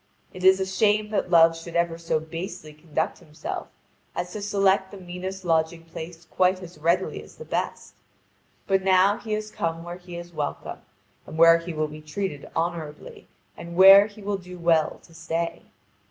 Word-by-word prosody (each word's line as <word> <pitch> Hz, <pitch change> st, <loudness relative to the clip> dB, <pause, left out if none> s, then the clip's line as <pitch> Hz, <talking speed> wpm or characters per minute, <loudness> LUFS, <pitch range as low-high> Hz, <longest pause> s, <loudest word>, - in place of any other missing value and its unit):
It 185 Hz, -, -9 dB
is 190 Hz, 0 st, +6 dB
a 190 Hz, -, 0 dB
shame 210 Hz, +2 st, +1 dB
that 205 Hz, -, -1 dB
Love 165 Hz, -1 st, +6 dB
should 165 Hz, +1 st, -9 dB
ever 170 Hz, -1 st, +1 dB
so 165 Hz, -2 st, 0 dB
basely 160 Hz, -1 st, -7 dB
conduct 155 Hz, +1 st, -3 dB
himself 155 Hz, 0 st, -6 dB, 0.5 s
as 175 Hz, 0 st, -4 dB
to 210 Hz, -, -5 dB
select 195 Hz, -1 st, +2 dB
the 200 Hz, -, -10 dB
meanest 185 Hz, +1 st, -7 dB
lodging 165 Hz, 0 st, +1 dB
place 165 Hz, +1 st, -9 dB
quite 185 Hz, +3 st, +2 dB
as 170 Hz, -3 st, -11 dB
readily 170 Hz, +4 st, 0 dB
as -, -, -15 dB
the 475 Hz, -, -10 dB
best. -, -, -3 dB, 0.7 s
But 195 Hz, -1 st, +2 dB
now 190 Hz, +2 st, +4 dB
he 220 Hz, -3 st, -4 dB
has 215 Hz, 0 st, -3 dB
come 165 Hz, -2 st, -3 dB
where 175 Hz, +1 st, -7 dB
he 175 Hz, -1 st, -10 dB
is 175 Hz, 0 st, -9 dB
welcome, 150 Hz, -2 st, -4 dB, 0.5 s
and 155 Hz, -, -8 dB
where 165 Hz, 0 st, +7 dB
he 170 Hz, +1 st, -6 dB
will 155 Hz, -1 st, -1 dB
be 150 Hz, +1 st, -10 dB
treated 155 Hz, -1 st, -5 dB
honourably, 165 Hz, -3 st, -4 dB, 0.3 s
and 170 Hz, 0 st, -9 dB
where 195 Hz, +2 st, +9 dB
he 210 Hz, -1 st, -14 dB
will 200 Hz, 0 st, -1 dB
do 180 Hz, -1 st, -11 dB
well 165 Hz, -2 st, +2 dB
to 165 Hz, -, -19 dB
stay. 165 Hz, 0 st, -3 dB
175 Hz, 185 wpm, -25 LUFS, 165-190 Hz, 0.7 s, where